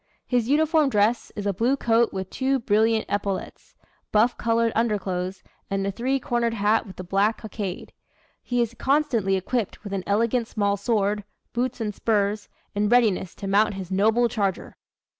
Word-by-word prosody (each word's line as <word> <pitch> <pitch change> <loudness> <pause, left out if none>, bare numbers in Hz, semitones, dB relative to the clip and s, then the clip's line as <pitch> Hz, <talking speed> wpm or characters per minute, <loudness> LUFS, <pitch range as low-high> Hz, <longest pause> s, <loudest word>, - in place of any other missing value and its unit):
His 245 -2 0
uniform 310 0 +3
dress 215 +1 +1
is 205 - -5
a 200 - +1
blue 240 +8 +1
coat 230 -2 +2
with 190 -1 -5
two 270 +1 +1
brilliant 220 -1 +2
epaulets, 200 -1 -4 0.4
buff 230 +3 +3
colored 230 0 +1
underclothes, 190 -4 -1 0.3
and 195 0 -1
a 200 - 0
three 255 +6 -1
cornered 240 -4 -1
hat 215 +2 +2
with 185 - -12
a - - -4
black 200 +4 +1
cockade. 205 -4 -6 0.5
He 245 -1 0
is 235 0 -5
constantly 250 -8 +1
equipped 210 +4 -2
with 200 -2 -6
an 190 -2 -2
elegant 230 +3 +1
small 200 -2 0
sword, 205 0 0 0.3
boots 250 +1 -1
and 215 -2 -2
spurs, 205 -1 0 0.2
in 205 0 +1
readiness 215 -7 +2
to 200 - -6
mount 205 +1 +3
his 190 -1 -7
noble 220 +5 +3
charger." 200 -5 -2
215 Hz, 165 wpm, -24 LUFS, 200-235 Hz, 0.5 s, uniform